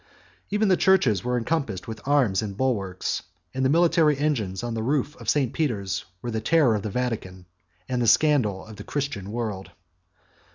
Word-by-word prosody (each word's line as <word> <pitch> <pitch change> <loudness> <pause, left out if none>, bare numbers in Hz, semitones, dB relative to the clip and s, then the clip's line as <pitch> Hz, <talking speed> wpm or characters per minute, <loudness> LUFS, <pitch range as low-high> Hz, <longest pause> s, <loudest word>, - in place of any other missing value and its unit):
Even 210 +1 +1
the 185 -2 +4
churches 155 - +3
were 125 0 0
encompassed 120 - -2
with 110 -1 -7
arms 130 -10 +3
and 100 -3 -5
bulwarks, 100 -9 -1 0.3
and 130 - -1
the 130 - +3
military 165 -2 +4
engines 120 -10 -1
on 120 -1 -3
the 115 - -2
roof 140 +4 0
of - - -5
St. 135 -5 +1
Peter's 100 - -2 0.2
were 120 - -3
the 110 -1 -2
terror 145 -1 +4
of 105 - -1
the 105 - -4
Vatican 100 -6 -3 0.4
and 125 -1 -1
the 120 - +1
scandal 115 -7 +3
of 110 -2 -11
the - - -8
Christian 135 -9 -4
world. 110 -5 -4
120 Hz, 180 wpm, -25 LUFS, 105-145 Hz, 0.4 s, the